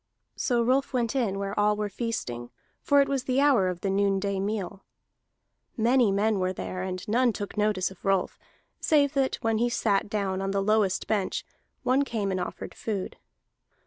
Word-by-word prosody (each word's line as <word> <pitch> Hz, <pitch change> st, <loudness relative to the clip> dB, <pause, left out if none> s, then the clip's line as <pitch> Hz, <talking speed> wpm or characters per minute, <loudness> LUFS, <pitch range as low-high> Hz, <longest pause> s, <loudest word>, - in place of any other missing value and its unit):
So 240 Hz, -2 st, +1 dB
Rolf 265 Hz, +4 st, +1 dB
went 240 Hz, 0 st, 0 dB
in 220 Hz, -7 st, 0 dB
where 200 Hz, 0 st, -3 dB
all 210 Hz, 0 st, +3 dB
were 210 Hz, 0 st, -2 dB
feasting, 185 Hz, -, -4 dB, 0.3 s
for 285 Hz, -1 st, +4 dB
it 275 Hz, -, +2 dB
was 275 Hz, -2 st, -1 dB
the 260 Hz, +1 st, +1 dB
hour 275 Hz, -10 st, +4 dB
of 180 Hz, -1 st, -5 dB
the 195 Hz, -, -1 dB
noonday 200 Hz, 0 st, +1 dB
meal. 195 Hz, -1 st, -3 dB, 0.9 s
Many 240 Hz, -1 st, +4 dB
men 205 Hz, +1 st, +1 dB
were 185 Hz, 0 st, 0 dB
there, 185 Hz, 0 st, -5 dB
and 185 Hz, 0 st, -5 dB
none 240 Hz, +3 st, +3 dB
took 205 Hz, -2 st, -6 dB
notice 210 Hz, -3 st, +1 dB
of 190 Hz, -, -15 dB
Rolf, 195 Hz, -2 st, 0 dB, 0.4 s
save 285 Hz, -2 st, +3 dB
that 270 Hz, -2 st, +1 dB
when 225 Hz, -1 st, +1 dB
he 240 Hz, +1 st, +2 dB
sat 205 Hz, -4 st, +1 dB
down 195 Hz, -2 st, -1 dB
on 195 Hz, -, -2 dB
the 195 Hz, 0 st, 0 dB
lowest 210 Hz, -2 st, +2 dB
bench 205 Hz, -4 st, -1 dB, 0.4 s
one 260 Hz, +2 st, +3 dB
came 215 Hz, -7 st, -2 dB
and 185 Hz, -, -1 dB
offered 180 Hz, -, -5 dB
food. 200 Hz, -4 st, -4 dB
210 Hz, 180 wpm, -27 LUFS, 195-240 Hz, 0.9 s, for